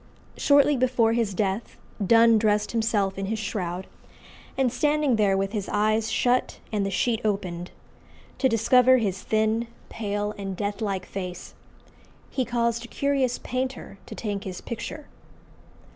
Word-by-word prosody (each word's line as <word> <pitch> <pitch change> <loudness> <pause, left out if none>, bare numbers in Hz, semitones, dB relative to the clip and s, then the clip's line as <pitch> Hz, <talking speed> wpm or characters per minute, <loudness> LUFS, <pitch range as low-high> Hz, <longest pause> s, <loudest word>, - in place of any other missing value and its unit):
Shortly 285 0 +4
before 245 -3 +2
his 225 -4 0
death 200 +3 -2 0.3
Donne 230 +2 +6
dressed 210 -1 +1
himself 210 -4 0
in 195 - -2
his 220 +2 -1
shroud, 190 -4 -3 0.7
and 260 -3 +2
standing 295 -1 +2
there, 200 -3 +3
with 195 0 -1
his 210 -3 -3
eyes 215 +1 +1
shut 245 +3 +1
and 210 -2 0
the 195 - -1
sheet 225 +4 0
opened, 185 -4 -2 0.7
"To 265 - +3
discover 250 +3 +5
his 195 -5 -1
thin, 220 +2 +1 0.2
pale, 205 -1 -3
and 195 -2 -4
death 205 0 -3
like 195 -3 -2
face," 180 -2 -6 0.8
he 260 - 0
caused 235 0 0
a - - -8
curious 270 -2 0
painter 255 -5 -4
to - - -8
take 205 -3 -3
his 185 -2 -6
picture. 250 +6 -6
220 Hz, 145 wpm, -25 LUFS, 200-240 Hz, 0.8 s, Donne